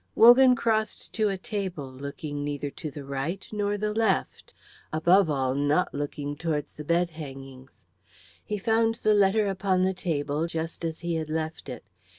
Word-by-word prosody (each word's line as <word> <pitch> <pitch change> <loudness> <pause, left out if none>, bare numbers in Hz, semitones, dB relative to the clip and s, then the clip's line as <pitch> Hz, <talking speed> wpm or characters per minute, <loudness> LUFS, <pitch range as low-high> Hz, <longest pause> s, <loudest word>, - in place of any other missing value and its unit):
Wogan 250 +2 +8
crossed 220 -2 -1
to 215 -2 +1
a 195 - -2
table, 185 - -4
looking 145 +2 -6
neither 145 -1 -3
to 155 - -6
the 145 -1 -9
right 140 +8 -3
nor 205 -1 -1
the 210 +1 -1
left, 220 -3 0 0.4
above 170 +3 +4
all 135 -3 0
not 145 +5 +1
looking 145 0 -4
towards 155 -1 -3
the 150 - -8
bed 170 +2 +1
hangings. 135 -4 -10 0.6
He 210 - -3
found 225 +2 +2
the 215 -2 +2
letter 205 +1 +4
upon 190 -1 +1
the 190 0 +2
table 155 -3 -1
just 165 0 -4
as 160 -1 -3
he 170 0 -2
had 160 -1 -2
left 160 -2 -3
it. 125 - -7
165 Hz, 165 wpm, -27 LUFS, 145-205 Hz, 0.6 s, Wogan